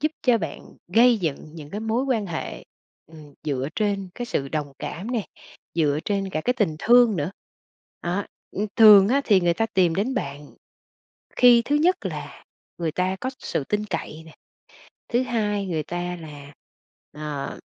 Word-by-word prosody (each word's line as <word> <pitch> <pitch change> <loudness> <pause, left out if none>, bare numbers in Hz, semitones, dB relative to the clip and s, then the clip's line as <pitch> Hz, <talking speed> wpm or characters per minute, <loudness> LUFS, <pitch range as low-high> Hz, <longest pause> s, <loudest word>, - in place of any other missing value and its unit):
giúp 310 +2 0
cho 240 -3 +4
bạn 165 -6 -5 0.3
gây 235 +4 +5
dựng 160 -7 -1 0.2
những 150 -2 -10
cái 205 - -4
mối 225 +4 0
quan 235 -7 0
hệ, 170 -3 -5 0.4
ừm, 150 -3 -14
dựa 140 -3 -1
trên 200 -3 -1
cái 245 - -5
sự 140 -11 -2
đồng 145 -1 -3
cảm 200 +8 -5
nè, 235 -4 0 0.5
dựa 150 -3 +2
trên 195 -2 -1
cả 155 - -2
cái 250 - +3
tình 205 -11 0
thương 240 -1 +5
nữa. 150 +2 -2 0.7
Đó, 180 +3 -1 0.3
ưm, 210 - -2
thường 210 -3 +9
á 275 +4 +3
thì 200 -4 +4
người 175 -1 +2
ta 225 - 0
tìm 185 -6 +2
đến 215 +9 -1
bạn 145 - -4 0.9
khi 245 -1 +7
thứ 290 - +1
nhất 340 +5 +2
là - - -6 0.3
người 165 -2 -2
ta 185 +3 -1
có 255 - -1
sự 140 - -2
tin 210 +6 -2
cậy 160 -3 -5
nè, 160 - -15 0.7
thứ 240 +2 +2
hai 210 -5 -1
người 160 -3 -2
ta 175 +2 -4
là, 145 -2 -11 0.6
à, 150 -2 -5
190 Hz, 175 wpm, -24 LUFS, 155-225 Hz, 0.9 s, thường